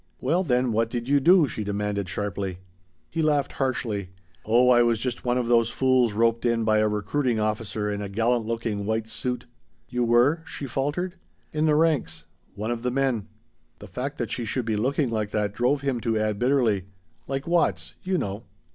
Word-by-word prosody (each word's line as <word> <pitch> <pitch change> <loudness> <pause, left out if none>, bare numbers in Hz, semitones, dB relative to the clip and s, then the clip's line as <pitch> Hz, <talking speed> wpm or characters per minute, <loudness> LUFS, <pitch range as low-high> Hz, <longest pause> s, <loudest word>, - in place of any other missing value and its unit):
"Well 180 +4 +1
then 125 -5 +1
what 115 +1 +1
did 120 0 -4
you 140 +1 +4
do?" 170 +2 +5
she 110 -3 -4
demanded 100 -1 -2
sharply. 95 -1 -3 0.5
He 165 - -1
laughed 150 -3 +1
harshly. 115 -8 -2 0.3
"Oh 120 +3 +4
I 120 -1 +6
was 120 -1 +3
just 120 +1 -4
one 125 0 +1
of 125 -2 -1
those 115 -1 +4
fools 130 -4 +2
roped 115 +1 +2
in 115 -1 +1
by 110 -1 +3
a 110 - +3
recruiting 110 +4 0
officer 105 -1 -2
in 105 0 -2
a 100 - -4
gallant 115 +3 +1
looking 115 -3 -2
white 110 0 -1
suit!" 125 +2 -3 0.4
"You 125 0 0
were 120 +7 +3
?" - - -27
she 145 - -5
faltered. 145 +8 -2 0.4
"In 155 +1 +1
the 150 - +4
ranks. 150 - +1 0.3
One 110 +4 -3
of 120 -1 -3
the 125 - 0
men." 125 -5 0 0.5
The - - -11
fact 140 +3 -5
that - - -3
she 120 - -2
should 115 +2 -2
be 110 -1 0
looking 130 +4 0
like 110 -2 -1
that 105 -1 -1
drove 125 +5 +1
him 135 -4 -1
to 115 -1 0
add 110 -1 -1
bitterly: 120 -7 +2 0.4
"Like 135 +1 -3
Watts, 95 - +1
you 185 0 0
know." 100 - -4
120 Hz, 200 wpm, -25 LUFS, 105-135 Hz, 0.5 s, I